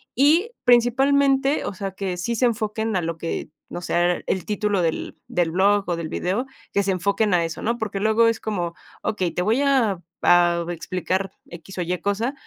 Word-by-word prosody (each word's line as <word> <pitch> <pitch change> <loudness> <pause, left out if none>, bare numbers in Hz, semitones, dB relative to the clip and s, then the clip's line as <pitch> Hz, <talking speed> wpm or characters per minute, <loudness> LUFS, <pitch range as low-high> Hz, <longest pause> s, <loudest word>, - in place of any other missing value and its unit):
y 320 - +4
principalmente, 270 +3 +3
o - - -3
sea, 195 0 -4
que 190 -2 -4
sí 230 +7 -2
se 250 - +2
enfoquen 220 -2 -1
a 180 - 0
lo 165 0 -3
que, 165 - -4 0.2
o - - -5
sea, 175 +1 +1
el 185 -3 -1
título 210 -2 0
del 165 -2 -2
del 170 -2 0
blog, 200 +3 +3
o, 175 - 0
del 165 -2 -5
video, 195 +10 -1 0.3
que 200 - +2
se 195 - 0
enfoquen 200 +2 +1
a 170 -1 +3
eso, 165 - -6
¿no? 235 +2 0
Porque 205 -3 -3
luego 220 +2 +4
es 230 - 0
como 175 -6 -2 0.3
okey, 190 -5 -1
te 180 - -2
voy 225 +7 +2
a 245 -10 +2 0.2
a 175 -1 +4
explicar 185 +2 -2 0.2
X 175 +3 -11
o - - -1
Y 180 +2 -1
cosa, 220 +7 -1
200 Hz, 195 wpm, -23 LUFS, 175-230 Hz, 0.3 s, y